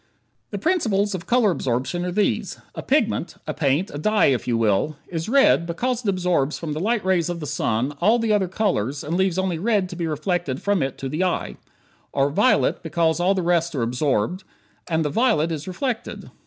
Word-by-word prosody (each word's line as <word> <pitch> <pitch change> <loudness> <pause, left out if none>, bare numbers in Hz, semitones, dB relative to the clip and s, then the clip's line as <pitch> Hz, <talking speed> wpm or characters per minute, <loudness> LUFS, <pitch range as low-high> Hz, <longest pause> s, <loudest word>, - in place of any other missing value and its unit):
The 205 - -4
principles 210 - +1
of 185 -2 -6
color 240 -4 +3
absorption 130 +4 -2
are 180 - -2
these: 190 - 0 0.2
a - - -6
pigment - - 0
a - - -3
paint, 145 +8 0
a 145 - -5
dye, 215 +6 +3
if 125 - -3
you 120 -2 +1
will 115 +7 +1
is 165 +2 -4
"red" 270 -10 +4
because 245 +8 -1
it 210 - 0
absorbs 180 -6 0
from 160 -3 -4
the 155 - -3
light 215 +2 0
rays 180 -3 +2
of 175 -1 -3
the 155 - -5
sun 125 -1 -1
all 215 +6 +4
the 225 -2 +1
other 200 -3 +2
colors 170 - -1
and 160 +3 -2
leaves 190 -1 +1
only 190 -3 -1
red 205 -2 +1
to 180 - -7
be 170 -1 -2
reflected 155 -2 -2
from 200 -3 0
it 135 -1 -2
to 135 - -5
the 155 +7 -1
eye. 185 - -1 0.6
Or 140 +1 +2
"violet" 210 - +2
because 160 0 0
all 185 +3 +2
the 185 - -1
rest 170 -1 +1
are 125 - 0
absorbed, 125 - 0 0.5
and 160 -1 +1
the 150 - -1
violet 220 - +2
is 155 0 -5
reflected. 225 +6 -4
175 Hz, 210 wpm, -23 LUFS, 150-200 Hz, 0.6 s, red